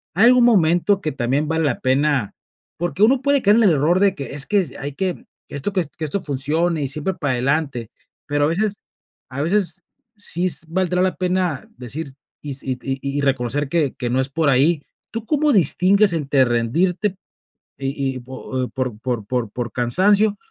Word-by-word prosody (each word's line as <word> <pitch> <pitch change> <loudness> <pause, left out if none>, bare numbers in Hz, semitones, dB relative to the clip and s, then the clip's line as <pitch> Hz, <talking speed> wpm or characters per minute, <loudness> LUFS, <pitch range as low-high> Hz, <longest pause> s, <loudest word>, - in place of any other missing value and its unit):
¿hay 215 +6 +6
algún 250 -1 +6
momento 190 -2 +3
que 155 - -2
también 135 +3 0
vale 160 0 0
la 135 -4 0
pena? 135 -3 +1 0.4
Porque 175 +4 -1
uno 250 +4 +4
puede 280 0 +2
caer 210 0 +4
en 235 - +4
el 200 - +5
error 160 +4 +2
de 200 -1 +3
que 140 - -6
es 145 -1 +5
que, 205 -3 +2
hay 140 +1 -5
que 185 +3 -3 0.2
esto 145 +8 -3
que 185 -2 +1 0.2
esto 160 +5 -2
funcione 155 +4 -1
y - - -1
siempre 150 +7 -2
para 150 -7 -2
adelante, 135 -2 -1 0.4
pero 145 0 +1
a - - +2
veces 200 +6 0 0.5
a 135 +2 -4
veces 190 +2 0 0.3
sí 185 -4 0
s 165 -1 -1
valdrá 180 +1 0
la 185 0 +1
pena 180 -5 -1
decir 130 +6 -5 0.3
y 145 -2 -5
si 135 -1 -2
y - - -9
y 135 -1 -3 0.2
y - - 0
reconocer 135 +1 0
que 150 -4 0
que 120 - -3
no 130 +2 +1
es 130 - -2
por 155 +2 0
ahí, 145 +4 +3 0.3
¿tú 230 0 -5
cómo 300 +3 +2
distingues 195 - +4
entre 140 -4 +2
rendirte 170 - 0 0.6
y 135 -1 -2
y - - -6
po 130 +2 -11 0.3
o - - -5
por 125 -5 -3 0.3
por 120 -2 -2
por 120 +1 -5
cansancio 200 - +2
155 Hz, 190 wpm, -21 LUFS, 135-190 Hz, 0.6 s, hay